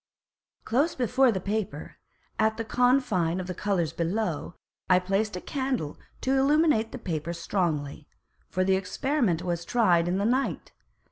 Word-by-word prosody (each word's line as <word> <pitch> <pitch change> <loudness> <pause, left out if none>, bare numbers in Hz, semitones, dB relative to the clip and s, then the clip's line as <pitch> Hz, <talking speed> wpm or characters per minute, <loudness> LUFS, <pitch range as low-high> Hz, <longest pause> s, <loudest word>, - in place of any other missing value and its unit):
Close 280 +9 +1
before 255 +1 +3
the 190 - -2
Paper, 195 -6 -4 0.4
at 220 0 +2
the 225 - -3
Confine 225 -9 +2
of 185 - -4
the 185 - -4
Colours 175 -5 -1
below, 170 -1 -2 0.3
I 180 - +6
placed 195 +3 0
a - - -3
Candle 260 - -2 0.3
to 265 +1 +1
illuminate 285 -5 +3
the - - -6
Paper 170 -6 -3
strongly: 160 -5 -2 0.4
For 185 - 0
the 190 0 +3
Experiment 195 - 0
was 170 -1 -2
tried 175 -5 +3
in 180 +2 0
the 200 - 0
Night. 255 +4 0
195 Hz, 150 wpm, -27 LUFS, 175-245 Hz, 0.4 s, I